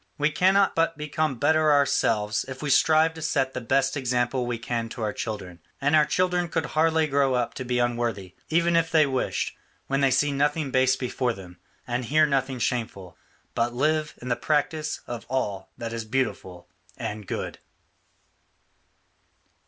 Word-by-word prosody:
We 150 +1 +1
cannot 190 +5 +3
but 165 -1 +1
become 150 -2 -1
better 155 +3 +3
ourselves 110 -7 +2
if 130 +1 -7
we 145 - 0
strive 160 +3 +4
to 160 - -9
set 135 -4 0
the 130 - -4
best 135 +4 +1
example 125 -1 0
we 120 -1 -2
can 115 -1 -3
to 115 - -6
our 105 -1 -1
children, 95 -6 -5 0.2
and 145 +2 +2
our 155 -1 +5
children 180 -1 +1
could 165 -3 -1
hardly 160 +1 +2
grow 140 -3 +2
up 120 -1 -1
to 130 - -5
be 125 0 -1
unworthy, 120 -6 -1 0.2
even 170 +1 +2
if 165 -1 +2
they 155 -2 +4
wished, 130 -2 -2 0.3
when 135 +1 0
they 135 - +4
see 145 +3 +2
nothing 145 +1 0
base 130 0 +3
before 125 -1 -1
them, 90 -4 -12 0.3
and 120 0 -2
hear 155 +5 +4
nothing 135 -2 0
shameful, 110 -8 -3 0.4
but 120 +1 -1
live 155 +3 0
in 125 - -5
the 120 - +2
practice 155 +2 -1
of 120 -1 -7
all 105 -7 -2
that 115 -1 -5
is 115 -1 -3
beautiful 105 -7 -3 0.3
and 105 -2 -5
good." - - -4
130 Hz, 170 wpm, -25 LUFS, 120-155 Hz, 0.4 s, our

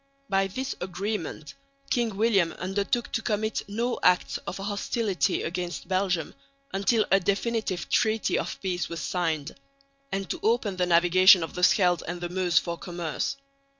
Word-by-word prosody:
By 195 0 +2
this 260 +8 -4
agreement 180 -3 -4 0.4
King 235 -5 0
William 200 -6 +3
undertook 200 +5 -2
to 225 - -1
commit 220 0 -1
no 235 +4 -1
acts 180 0 +3
of - - -4
hostility 200 -1 -1
against 175 +1 -4
Belgium 185 -4 0 0.4
until 210 +3 +2
a 195 - +6
definitive 200 0 -1
treaty 220 0 +1
of - - -4
peace 180 -2 -2
was 170 - -5
signed, 160 -1 -2 0.6
and 195 0 -2
to - - -3
open 220 -4 +1
the 180 -1 +1
navigation 180 +1 +6
of 160 - -6
the 180 - -5
Scheldt 180 -1 +4
and 175 +1 -4
the 175 0 -4
Meuse 180 -1 +1
for 170 -1 +1
commerce. 175 - -3
190 Hz, 150 wpm, -27 LUFS, 175-210 Hz, 0.6 s, a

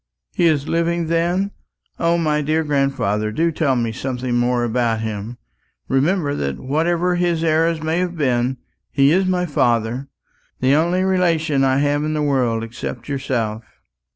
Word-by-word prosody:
"He 170 - +3
is 150 -3 +1
living, 170 0 0
then? 175 +4 +1 0.5
O, 170 0 +2
my 155 -2 +1
dear 155 +2 0
grandfather, 135 -8 0
do 165 +8 +1
tell 150 -4 +1
me 115 -2 0
something 125 +1 -3
more 120 0 +1
about 115 -1 0
him. 110 +2 -5 0.5
Remember 145 +3 +1
that 70 - -2
whatever 170 +6 0
his 170 -2 0
errors 165 0 +1
may 160 +2 0
have 180 -1 -2
been, 130 -2 0 0.3
he 140 0 +3
is 185 +3 +2
my 180 -1 +1
father 120 -3 0 0.5
the 130 +2 +3
only 170 +5 +2
relation 165 -6 +1
I 130 0 +3
have 145 +1 +1
in 155 0 -1
the 150 - 0
world 125 -6 +1
except 115 +1 -6
yourself." 120 -5 -2
145 Hz, 155 wpm, -20 LUFS, 125-165 Hz, 0.5 s, He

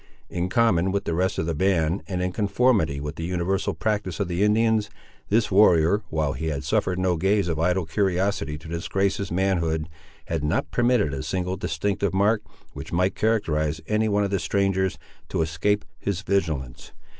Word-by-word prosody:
In 90 +1 -2
common 95 -4 +2
with 100 +1 -1
the 85 - -1
rest 95 +3 0
of - - 0
the 85 - -1
band, 85 +1 +1
and 90 -2 -2
in 90 - -1
conformity 100 - +1
with 75 +2 -5
the 80 - -4
universal 90 +2 -1
practice 105 -6 -2
of 100 - 0
the 90 +1 -2
Indians, 110 0 +2 0.4
this 110 +1 +2
warrior, 95 -1 +5
while 75 -3 0
he 80 +4 -4
had 75 -2 -2
suffered 90 +3 0
no 90 -2 +1
gaze 95 +2 +2
of 80 -2 -1
idle 90 +2 +1
curiosity 95 -2 0
to 80 - -12
disgrace 95 +4 -1
his 100 -3 -4
manhood, 85 -4 0 0.4
had - - -2
not 75 +1 0
permitted 120 - +2
a 70 - -3
single 90 +4 -2
distinctive 95 +3 -1
mark, 105 +3 +3 0.3
which 75 +2 -8
might 90 +3 +1
characterise 80 -9 0
any 110 +2 +1
one 105 0 +2
of 100 - -2
the 100 - +1
strangers, 95 +1 0 0.3
to 80 - 0
escape 90 +6 0
his 100 -1 -3
vigilance. 80 -12 -2
95 Hz, 180 wpm, -24 LUFS, 80-100 Hz, 0.4 s, warrior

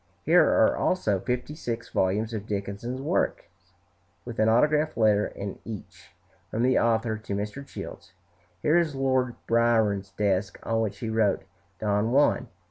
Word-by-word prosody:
Here - - +6
are - - +4
also 110 - +1
fifty 125 +6 -3
six 115 -7 -5
volumes 105 +5 0
of 105 -1 -5
Dickens' 105 +5 -4
works, 150 +7 0 0.8
with 120 -2 -7
an 110 0 +4
autograph 150 +6 +2
letter 105 -2 +3
in 100 0 -7
each, 110 -3 -9 0.4
from 115 - -1
the 130 +1 +4
author 115 -1 +1
to 105 -2 -4
Mr. 105 +7 -4
Childs. 135 - -9 0.5
Here 160 +3 +4
is 160 -4 -1
Lord 130 -2 +1
Byron's 110 -4 +2
desk 100 0 -1
on 115 0 0
which 110 -3 -2
he 115 - -4
wrote 110 -3 +1 0.4
"Don 105 +1 +1
Juan." 140 +3 +3
115 Hz, 150 wpm, -26 LUFS, 105-125 Hz, 0.8 s, Here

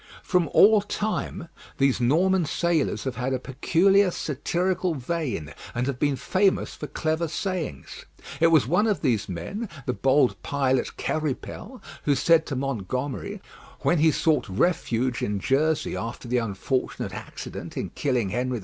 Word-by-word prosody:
From 180 -4 +2
all 215 0 +7
time 205 -3 -3 0.3
these 135 -2 +2
Norman 175 +9 +3
sailors 170 0 0
have 130 -4 -4
had 125 +2 -1
a - - 0
peculiar 180 +10 +3
satirical 175 +3 -1
vein, 130 - -3 0.2
and 120 +1 0
have 135 -2 -3
been 145 -2 +2
famous 185 +9 +1
for - - -7
clever 160 +1 -1
sayings. 170 - -4 0.3
It 165 - +6
was 160 -7 +5
one 180 - +2
of 210 -4 0
these 110 -7 +1
men, 195 - -5 0.2
the 125 - 0
bold 135 0 +2
pilot 130 -2 0
Quéripel, 155 - -4 0.2
who 145 - +3
said 165 +2 +4
to 135 - -3
Montgomery, 135 - -3 0.4
when 175 - +2
he 160 +1 +5
sought 155 -6 +1
refuge 125 - 0
in 105 -1 -1
Jersey 155 +7 +1
after 115 +2 -5
the 125 +1 +1
unfortunate 115 +4 -2
accident - - -7
in - - -3
killing 125 -8 0
Henry 125 +3 -1
II. - - -5
145 Hz, 150 wpm, -25 LUFS, 125-175 Hz, 0.4 s, all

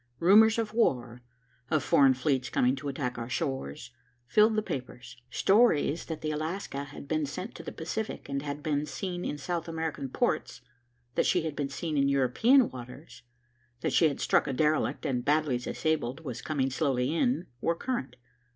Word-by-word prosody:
Rumors 215 - +6
of 220 -2 -2
war, 125 - 0 0.5
of 155 -3 +1
foreign 135 -2 +5
fleets 130 -1 0
coming 125 +2 +2
to 140 - -6
attack 130 -3 -3
our 115 +1 -5
shores, 135 - -3 0.3
filled 215 - +4
the 215 - +1
papers. 130 - -6
Stories 175 - +3
that 160 -2 -6
the 155 - -2
Alaska 155 -2 -3
had 140 0 -10
been 155 +1 0
sent 185 +9 -6
to - - -9
the 165 - -7
Pacific 215 +7 -5
and 140 0 -2
had 145 0 -5
been 150 -1 0
seen 175 +5 -4
in 150 - -3
South 170 +4 -3
American 160 -4 -3
ports, - - -1 0.5
that - - +2
she 175 - +2
had 160 -3 -3
been 145 -1 -2
seen 155 +2 -3
in 140 0 +3
European 200 - +4
waters, 125 +4 -10 0.6
that - - -1
she 165 - +5
had 140 - -3
struck - - +2
a 135 - -1
derelict 155 +3 +1
and, 125 -2 -1
badly 145 -3 +2
disabled, 150 0 -2
was 125 -2 -5
coming 135 -3 -1
slowly 130 -1 0
in, 245 0 +1 0.2
were 170 - +1
current. 240 - -3
150 Hz, 180 wpm, -29 LUFS, 130-170 Hz, 0.6 s, Rumors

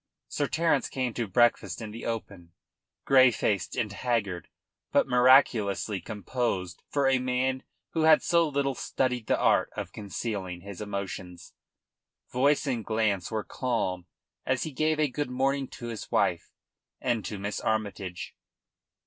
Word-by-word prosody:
Sir 145 - -1
Terence 160 -2 +1
came 130 -3 -2
to 115 -1 -2
breakfast 120 +4 +2
in 110 -2 -6
the 115 - -6
open, 100 -7 -5 0.5
grey 130 -1 +7
faced 100 -5 -1
and 105 -3 -1
haggard, 105 -7 -2 0.4
but - - +3
miraculously 125 -6 +4
composed 100 -2 -3
for 140 -2 +1
a 135 -1 +3
man 130 +1 0 0.3
who 160 - 0
had 155 -1 +6
so 170 -2 +3
little 140 -1 0
studied 125 -3 -1
the - - +2
art - - +3
of - - -4
concealing 100 -3 -5
his 100 0 -9
emotions. 95 -4 -6 0.8
Voice 140 +4 +2
and 125 -5 -1
glance 110 -4 0
were 110 -2 -2
calm 95 -9 -2 0.4
as 130 -1 0
he 155 - -4
gave 155 +3 0
a 155 - +3
good 145 +1 -3
morning 135 +2 0
to 120 -2 -8
his 115 -2 -6
wife - - +1 0.5
and 120 -4 0
to 100 +3 -5
Miss 100 +1 -3
Armytage. 100 -4 -3
120 Hz, 150 wpm, -28 LUFS, 100-130 Hz, 0.8 s, grey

